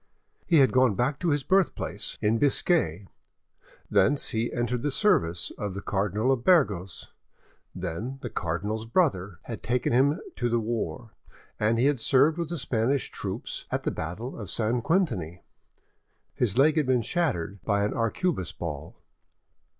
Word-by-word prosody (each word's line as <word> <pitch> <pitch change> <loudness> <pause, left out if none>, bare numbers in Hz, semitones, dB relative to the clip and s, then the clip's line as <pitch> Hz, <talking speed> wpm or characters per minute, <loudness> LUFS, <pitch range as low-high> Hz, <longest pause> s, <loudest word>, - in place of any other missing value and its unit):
He 170 - +4
had 135 -3 +5
gone 130 -5 +3
back 135 +5 0
to 175 - 0
his 145 -2 +1
birthplace, 190 +3 0
in 110 +2 +2
Biscay; 140 - +2 0.8
thence 105 +8 +2
he 115 +1 -1
entered 120 0 -1
the 145 - 0
service 85 - +1
of 100 -2 -3
the 100 - -4
Cardinal 105 +5 0
of 130 -3 0
Burgos; 105 - +1 0.6
then 95 +9 -4
the 120 - -3
cardinal's 105 +5 -3
brother 105 - +1
had 115 - -7
taken 120 0 0
him 140 +6 +3 0.2
to 120 - 0
the 120 0 +2
war, 115 +1 -3 0.5
and 110 +2 +2
he 120 - +2
had 140 -2 +2
served 145 +7 +3
with 170 -2 -2
the 170 - -3
Spanish 130 0 0
troops; - - -5
at - - -2
the - - 0
battle 95 +12 -5
of 105 - -7
St. 115 +2 0
Quentiny—his 115 - -4
leg 150 +3 +4
had 150 -4 +2
been 125 -3 +2
shattered 100 - -2
by 100 -2 +1
an 105 - -2
arquebus 115 - -1
ball. 80 -2 -6
120 Hz, 155 wpm, -27 LUFS, 100-140 Hz, 0.8 s, had